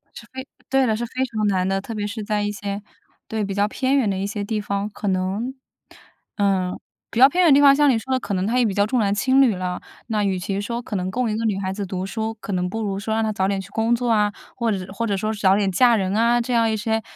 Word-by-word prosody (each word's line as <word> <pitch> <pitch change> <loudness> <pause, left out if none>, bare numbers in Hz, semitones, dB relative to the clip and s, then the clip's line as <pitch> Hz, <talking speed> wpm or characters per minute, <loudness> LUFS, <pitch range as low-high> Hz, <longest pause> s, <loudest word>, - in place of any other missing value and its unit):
是 - - -10
非 260 0 -7 0.2
对 270 0 +3
了， 220 -3 +1
是 240 - -3
非 255 +2 -2
常 220 -4 -2
难 185 -2 +1
的， 195 0 0
特 225 - -7
别 205 -1 -3
是 215 +1 -5
在 210 0 -1
一 205 - -1
些 200 0 -5 0.5
对， 220 -1 -2
比 195 -1 -3
较 205 +1 +2
偏 265 +5 0
远 235 -7 +2
的 190 - -1
一 195 - -2
些 205 0 -3
地 210 +1 -2
方 200 0 -2
可 205 - -6
能 190 +7 -1 0.8
嗯， 190 -3 0 0.3
比 230 - -2
较 265 - +10
偏 360 +5 +2
远 320 -5 +6
的 - - +6
地 - - +5
方 280 -1 +7
像 295 0 +4
你 250 - +3
说 260 +4 -4
的， 260 - +2
可 205 - -4
能 185 +1 0
他 240 +3 +1
也 245 - +3
比 205 - 0
较 205 +1 +2
重 250 +2 +1
男 200 -2 +2
轻 260 +6 +3
女 245 -6 +4
了。 180 0 -4 0.3
那 215 -3 0
与 190 -2 0
其 195 +2 -3
说 235 +3 -3
可 215 - -6
能 185 0 -2
供 245 +2 0
一 215 - -1
个 225 +1 -2
女 200 -3 0
孩 190 -1 -2
子 200 0 -4
读 185 0 -4
书， 220 +3 -3
可 205 - -5
能 180 0 -1
不 225 +4 -3
如 195 -2 -2
说 220 +2 -3
让 225 0 +1
她 215 - 0
早 190 -2 0
点 195 0 -1
去 190 - -12
工 225 +2 +1
作 240 0 -2
啊， 210 -2 +2 0.2
或 235 -2 0
者 190 -2 -3
或 230 +3 -2
者 200 - 0
说 215 +2 -1
早 195 -3 +3
点 200 -2 +1
嫁 235 +5 +5
人 190 -1 -1
啊， 235 +2 +3
这 245 +1 -3
样 230 -1 +3
一 - - 0
些 220 +1 -1
210 Hz, 320 characters per minute, -22 LUFS, 195-235 Hz, 0.8 s, 较